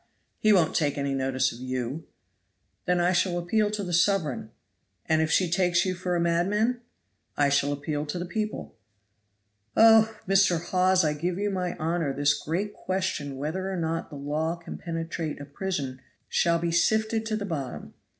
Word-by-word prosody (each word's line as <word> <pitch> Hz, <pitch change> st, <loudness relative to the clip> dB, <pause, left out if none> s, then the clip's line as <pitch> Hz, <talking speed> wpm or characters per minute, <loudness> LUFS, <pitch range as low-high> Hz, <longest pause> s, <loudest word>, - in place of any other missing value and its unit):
He 215 Hz, -, +4 dB
won't 180 Hz, -6 st, +3 dB
take 145 Hz, -4 st, +1 dB
any 140 Hz, -1 st, -1 dB
notice 130 Hz, -1 st, +1 dB
of 115 Hz, -, -11 dB
you." 130 Hz, +4 st, -4 dB, 0.8 s
"Then 180 Hz, 0 st, +2 dB
I 175 Hz, +1 st, +3 dB
shall 175 Hz, 0 st, +1 dB
appeal 205 Hz, +5 st, +1 dB
to 210 Hz, -1 st, -3 dB
the 180 Hz, -2 st, -4 dB
sovereign." 170 Hz, -, +1 dB, 0.6 s
"And 160 Hz, 0 st, +2 dB
if 160 Hz, -, +1 dB
she 185 Hz, +2 st, +3 dB
takes 175 Hz, +1 st, +2 dB
you 185 Hz, -, 0 dB
for 180 Hz, 0 st, -2 dB
a -, -, +1 dB
madman?" 200 Hz, +8 st, +1 dB, 0.6 s
"I 145 Hz, -1 st, +3 dB
shall 140 Hz, 0 st, +2 dB
appeal 145 Hz, +1 st, -3 dB
to 150 Hz, -, -3 dB
the 175 Hz, -, -3 dB
people. 215 Hz, +3 st, -4 dB, 1.0 s
Oh! 225 Hz, -1 st, +6 dB
Mr. 195 Hz, -3 st, +4 dB
Hawes, 185 Hz, +1 st, +2 dB
I 150 Hz, -, +2 dB
give 170 Hz, +4 st, -2 dB
you 205 Hz, +1 st, -1 dB
my 180 Hz, -2 st, -2 dB
honor 160 Hz, -3 st, -1 dB
this 145 Hz, +1 st, +3 dB
great 175 Hz, +8 st, -3 dB
question 185 Hz, -9 st, -3 dB
whether 180 Hz, +7 st, -3 dB
or 190 Hz, -, -3 dB
not 165 Hz, -1 st, -2 dB
the 150 Hz, -, -9 dB
law 150 Hz, +4 st, -2 dB
can 170 Hz, -1 st, -9 dB
penetrate 165 Hz, -2 st, -4 dB
a 145 Hz, -, -7 dB
prison 140 Hz, -4 st, -4 dB, 0.3 s
shall 170 Hz, -1 st, +2 dB
be 170 Hz, 0 st, -1 dB
sifted 220 Hz, +6 st, +2 dB
to 220 Hz, -, -1 dB
the 210 Hz, -1 st, -3 dB
bottom. 145 Hz, -9 st, -5 dB
170 Hz, 180 wpm, -27 LUFS, 150-190 Hz, 1.0 s, Oh